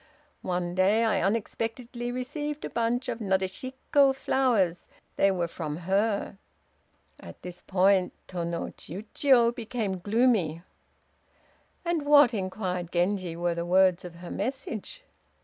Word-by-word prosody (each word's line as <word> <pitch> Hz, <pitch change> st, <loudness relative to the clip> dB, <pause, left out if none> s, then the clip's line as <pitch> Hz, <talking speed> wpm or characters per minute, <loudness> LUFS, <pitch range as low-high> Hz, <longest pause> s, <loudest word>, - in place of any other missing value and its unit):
One 180 Hz, -1 st, -2 dB
day 195 Hz, +5 st, +3 dB
I 220 Hz, -, +2 dB
unexpectedly 230 Hz, +3 st, -2 dB
received 295 Hz, +4 st, -4 dB
a -, -, -6 dB
bunch 235 Hz, +2 st, 0 dB
of 240 Hz, -2 st, -3 dB
Nadeshiko 255 Hz, +8 st, +1 dB
flowers. 230 Hz, -10 st, +1 dB, 0.3 s
They 195 Hz, -, +4 dB
were 180 Hz, -3 st, 0 dB
from 155 Hz, -3 st, -5 dB
her." 200 Hz, +1 st, 0 dB, 0.8 s
At -, -, -12 dB
this 180 Hz, 0 st, -8 dB
point 190 Hz, 0 st, +3 dB, 0.2 s
Tô 180 Hz, -2 st, -4 dB
no 170 Hz, 0 st, -3 dB
Chiûjiô 235 Hz, -, +2 dB
became 225 Hz, -5 st, -3 dB
gloomy. 205 Hz, -6 st, +1 dB, 1.2 s
"And 340 Hz, -2 st, 0 dB
what," 285 Hz, -4 st, +6 dB
inquired 185 Hz, -3 st, -3 dB
Genji, 180 Hz, -1 st, 0 dB
"were 175 Hz, 0 st, 0 dB
the 170 Hz, 0 st, -3 dB
words 185 Hz, 0 st, +3 dB
of 175 Hz, -2 st, -9 dB
her 175 Hz, +1 st, -9 dB
message?" 260 Hz, -, -4 dB
200 Hz, 125 wpm, -28 LUFS, 180-245 Hz, 1.2 s, what